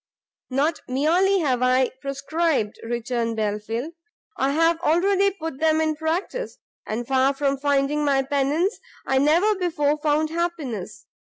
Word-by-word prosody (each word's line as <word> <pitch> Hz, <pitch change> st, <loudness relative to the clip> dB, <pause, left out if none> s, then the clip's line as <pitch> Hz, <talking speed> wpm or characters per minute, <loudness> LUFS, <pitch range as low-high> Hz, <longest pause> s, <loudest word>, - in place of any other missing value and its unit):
"Not 285 Hz, +5 st, 0 dB
merely 345 Hz, +9 st, +2 dB
have 255 Hz, -5 st, 0 dB
I 255 Hz, 0 st, +3 dB
prescribed," 275 Hz, -3 st, -1 dB
returned 235 Hz, 0 st, -2 dB
Belfield, 220 Hz, +7 st, -3 dB, 0.4 s
"I 270 Hz, -, 0 dB
have 330 Hz, +2 st, +3 dB
already 385 Hz, +4 st, +3 dB
put 325 Hz, -7 st, -7 dB
them 315 Hz, 0 st, +3 dB
in 315 Hz, -1 st, +1 dB
practice; 335 Hz, +10 st, -3 dB, 0.3 s
and 230 Hz, +2 st, -3 dB
far 270 Hz, +1 st, +2 dB
from 275 Hz, -1 st, 0 dB
finding 285 Hz, +1 st, +1 dB
any 270 Hz, -1 st, +2 dB
pennance, 290 Hz, -, 0 dB, 0.3 s
I 265 Hz, -, +2 dB
never 335 Hz, +10 st, +3 dB
before 305 Hz, -6 st, 0 dB
found 305 Hz, +1 st, +1 dB
happiness. 325 Hz, -, -4 dB
290 Hz, 135 wpm, -23 LUFS, 265-330 Hz, 0.4 s, I